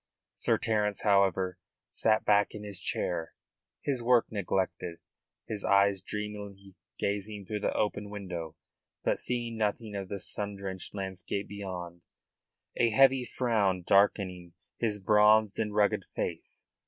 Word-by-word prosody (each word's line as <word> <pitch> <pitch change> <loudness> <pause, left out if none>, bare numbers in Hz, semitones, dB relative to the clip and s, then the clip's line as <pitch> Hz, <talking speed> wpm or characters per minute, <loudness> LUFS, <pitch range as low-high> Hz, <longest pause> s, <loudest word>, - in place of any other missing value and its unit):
Sir - - +1
Terence, 105 -2 0
however, 95 -3 +2 0.3
sat 110 -1 +2
back 105 0 +3
in 105 - -7
his 100 -3 -6
chair, 85 -2 -2 0.5
his 135 -4 0
work 120 0 +3
neglected, 95 -4 -2 0.5
his 105 -3 -3
eyes 100 -1 +4
dreamily 100 -1 -6 0.2
gazing 100 0 -3
through 105 +2 -3
the - - 0
open 105 -1 -1
window, 90 -6 -6 0.5
but - - +1
seeing 120 -2 -2
nothing 105 0 -1
of 95 -2 -4
the 100 - -4
sun 100 +2 -1
drenched 95 -1 -5
landscape 95 0 -3
beyond, 90 -4 -6 0.8
a 120 - +4
heavy 135 +2 +5
frown 105 -8 +1
darkening 95 -3 +2 0.3
his 105 -3 0
bronzed 105 +1 +4
and 105 -2 -1
rugged 105 -1 +2
face. - - -4
100 Hz, 130 wpm, -30 LUFS, 95-105 Hz, 0.8 s, heavy